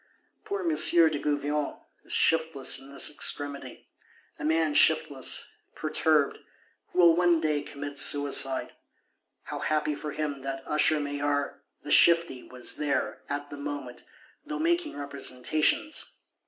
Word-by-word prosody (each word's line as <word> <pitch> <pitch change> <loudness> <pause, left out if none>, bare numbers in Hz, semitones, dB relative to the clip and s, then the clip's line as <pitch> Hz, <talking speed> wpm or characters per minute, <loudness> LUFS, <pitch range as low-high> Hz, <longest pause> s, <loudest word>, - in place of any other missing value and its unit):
Poor 400 -1 -3
M. 345 - -1
de 165 - +5
Gouvion 145 0 -2 0.3
is - - -9
shiftless 160 -4 +2
in 135 +1 -12
this 140 - +2
extremity;—a 145 -1 -5
man 160 0 +1
shiftless, 145 -3 +2 0.2
perturbed; 155 -1 +1 0.5
who - - -12
will 170 -2 +6
one 175 -1 +3
day 155 -2 0
commit 145 0 -7
suicide. 140 -2 +1 0.7
How - - -6
happy 155 0 -1
for 150 0 -6
him 145 -3 -4
that 135 0 -5
Usher 150 0 +2
Maillard, 145 0 -2 0.2
the 145 - -6
shifty, 170 -6 +4
was 125 -1 -4
there, 145 -2 -2
at 145 0 -5
the 145 - -7
moment, 140 -4 -7 0.4
though 300 0 -5
making 335 - -1
representations! 140 - -1
145 Hz, 125 wpm, -27 LUFS, 140-160 Hz, 0.7 s, will